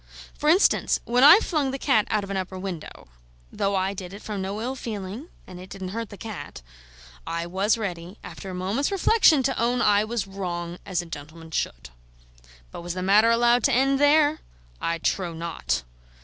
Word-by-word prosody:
For 300 - 0
instance, 365 +6 +3
when 245 +2 +2
I 300 +6 +10
flung 305 -9 0
the 270 - -3
cat 260 -6 +2
out 210 -1 0
of 200 - -7
an - - -2
upper 185 0 -4
window 185 -4 -7 0.4
(though 200 0 -1
I 190 +1 0
did 185 -1 -8
it 205 - -12
from 210 -3 -4
no 195 +2 -4
ill 250 +4 -3
feeling, 215 - -6 0.2
and 180 - -11
it 185 +1 -11
didn't 190 -1 -6
hurt 225 +2 -5
the 205 - -11
cat), 215 - -8 0.6
I 170 0 -2
was 195 +6 +1
ready, 180 -2 -5
after 195 - -9
a 185 - -6
moment's 200 - -1
reflection, 390 -7 +4
to 265 -2 -1
own 240 +1 +1
I 210 -3 +4
was 225 -1 -2
wrong, 175 -3 -5
as 180 -3 -1
a - - -12
gentleman 160 +1 -10
should. - - -3 0.8
But - - -8
was 175 0 -5
the 185 - -3
matter 210 +4 +5
allowed 240 0 +3
to 275 - +3
end 270 +2 +3
there? 295 +1 +4 0.4
I 165 0 -1
trow 170 0 -2
not. 165 - -3
200 Hz, 195 wpm, -25 LUFS, 180-245 Hz, 0.8 s, I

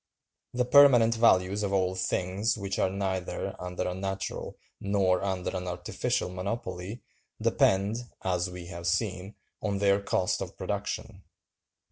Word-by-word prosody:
The 125 0 +2
permanent 125 -4 +7
values 100 -3 +3
of 100 -1 -1
all 95 -2 +1
things 95 +3 0
which 100 -1 -3
are - - +3
neither 95 -2 -3
under 90 0 -3
a 90 - -2
natural 95 +1 -4 0.2
nor 100 -2 +2
under 95 -1 -2
an 90 0 -3
artificial 90 0 -2
monopoly 95 +2 -5 0.4
depend, 100 +4 +2 0.3
as 90 -1 0
we 90 -1 -8
have 85 -1 -6
seen, 95 +1 -1 0.3
on 100 -2 -1
their 100 0 +3
cost 90 -2 0
of - - -6
production. 105 0 -4
95 Hz, 135 wpm, -29 LUFS, 90-100 Hz, 0.4 s, permanent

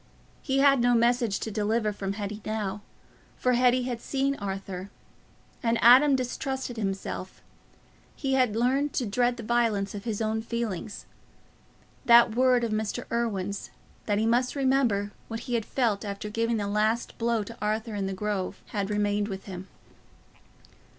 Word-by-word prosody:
He 270 -1 -1
had 275 -2 +5
no 245 0 +4
message 235 -3 +2
to 220 - -3
deliver 215 +1 0
from 195 -1 -3
Hetty 205 0 -5
now, 210 -2 -3 0.6
for 250 - +2
Hetty 250 +1 +3
had 245 -2 -4
seen 275 0 0
Arthur. 195 -1 -5 0.7
And 230 0 +1
Adam 270 +4 +7
distrusted 260 0 -3
himself—he 195 +6 -6
had 250 -5 +2
learned 265 +5 +1
to 250 - 0
dread 240 +3 +1
the 235 - -7
violence 220 -4 +1
of 205 +1 -7
his 220 -3 -2
own 220 0 -1
feeling. 225 -4 -3 1.1
That 235 -2 +7
word 250 -1 +4
of 230 - -1
Mr. 215 +3 -2
Irwine's—that 205 -2 -3
he 220 - +1
must 245 +3 +1
remember 260 -7 +1 0.2
what 225 0 -5
he 245 - -5
had 230 -2 0
felt 230 -6 0
after 205 0 -5
giving 230 +1 0
the 205 - -2
last 215 +3 0
blow 230 -2 +1
to 230 +3 -9
Arthur 215 +2 -1
in 200 -2 -2
the 195 - -3
Grove—had 200 0 -3
remained 205 0 0
with 195 -2 -6
him. 185 -1 -7
225 Hz, 150 wpm, -27 LUFS, 205-245 Hz, 1.1 s, Adam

